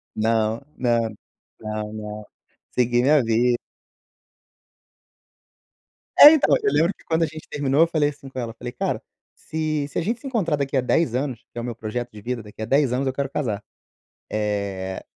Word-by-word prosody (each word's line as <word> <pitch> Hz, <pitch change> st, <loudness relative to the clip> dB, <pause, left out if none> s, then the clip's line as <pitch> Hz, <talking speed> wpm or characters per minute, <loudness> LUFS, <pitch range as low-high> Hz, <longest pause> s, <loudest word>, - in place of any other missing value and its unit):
Não, 110 Hz, +1 st, +1 dB, 0.2 s
não, 120 Hz, -2 st, +2 dB, 0.6 s
não, 110 Hz, 0 st, -4 dB
não. 105 Hz, -1 st, -7 dB, 0.5 s
Segui 120 Hz, -1 st, +2 dB
minha 140 Hz, +1 st, +4 dB
vida. 120 Hz, +2 st, +2 dB, 2.6 s
É, 295 Hz, -, +12 dB
então, 315 Hz, -, +4 dB
eu 415 Hz, -, +3 dB
lembro 170 Hz, +5 st, +3 dB
que -, -, -21 dB
quando 165 Hz, 0 st, +1 dB
a -, -, +4 dB
gente 155 Hz, 0 st, -9 dB
terminou 145 Hz, +1 st, +1 dB
eu 165 Hz, -, +6 dB
falei 155 Hz, -3 st, +2 dB
assim 140 Hz, -2 st, -11 dB
com 130 Hz, -, -6 dB
ela, 115 Hz, -2 st, -4 dB
falei: 120 Hz, +1 st, -7 dB
"Cara, -, -, -2 dB, 0.3 s
se 155 Hz, -2 st, -2 dB
se -, -, -7 dB
a -, -, 0 dB
gente 225 Hz, +7 st, -1 dB
se 270 Hz, -, -8 dB
encontrar 200 Hz, -, +1 dB
daqui 140 Hz, -1 st, -2 dB
a -, -, +3 dB
10 125 Hz, 0 st, +1 dB
anos, 130 Hz, -3 st, -2 dB
que -, -, -14 dB
é -, -, -2 dB
o -, -, -6 dB
meu 120 Hz, -1 st, -4 dB
projeto 115 Hz, +2 st, -4 dB
de 105 Hz, -, -11 dB
vida, 120 Hz, +2 st, -3 dB
daqui 105 Hz, +1 st, -12 dB
a -, -, -1 dB
10 135 Hz, +2 st, +3 dB
anos 135 Hz, +2 st, 0 dB
eu 130 Hz, -, 0 dB
quero 140 Hz, 0 st, -2 dB
casar. 115 Hz, -8 st, -2 dB, 0.7 s
Eh, 100 Hz, -3 st, -2 dB
125 Hz, 190 wpm, -23 LUFS, 110-150 Hz, 2.6 s, É